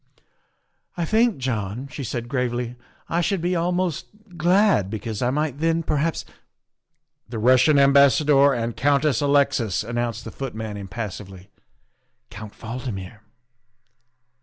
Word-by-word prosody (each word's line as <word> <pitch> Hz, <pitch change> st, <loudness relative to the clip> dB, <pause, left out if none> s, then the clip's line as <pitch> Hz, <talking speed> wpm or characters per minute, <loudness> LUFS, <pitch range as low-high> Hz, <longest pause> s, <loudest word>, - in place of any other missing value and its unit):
" -, -, -44 dB
I 170 Hz, -, -1 dB
think, 225 Hz, +4 st, +2 dB
John," 120 Hz, -1 st, -3 dB
she 145 Hz, -1 st, -6 dB
said 120 Hz, 0 st, -4 dB
gravely, 125 Hz, -2 st, -2 dB, 0.2 s
" -, -, -33 dB
I 170 Hz, -, 0 dB
should 190 Hz, +3 st, 0 dB
be 175 Hz, +2 st, -1 dB
almost 175 Hz, -1 st, -1 dB, 0.3 s
glad, 180 Hz, -, +3 dB
because 110 Hz, 0 st, -5 dB
I 120 Hz, -, +1 dB
might 145 Hz, 0 st, -2 dB
then 165 Hz, +1 st, +1 dB
perhaps 155 Hz, +1 st, -1 dB, 0.5 s
" -, -, -51 dB
The 115 Hz, -, -5 dB
Russian 130 Hz, +6 st, +4 dB
Ambassador 140 Hz, +1 st, +5 dB
and 115 Hz, -3 st, -2 dB
Countess 140 Hz, -2 st, +2 dB
Alexis," 140 Hz, -8 st, +1 dB
announced 115 Hz, 0 st, -3 dB
the -, -, -8 dB
footman 110 Hz, -5 st, -6 dB
impassively. 100 Hz, -1 st, -7 dB, 0.4 s
" -, -, -48 dB
Count 105 Hz, 0 st, -9 dB
Valdmir." 110 Hz, -4 st, -6 dB
130 Hz, 135 wpm, -23 LUFS, 115-155 Hz, 0.5 s, Ambassador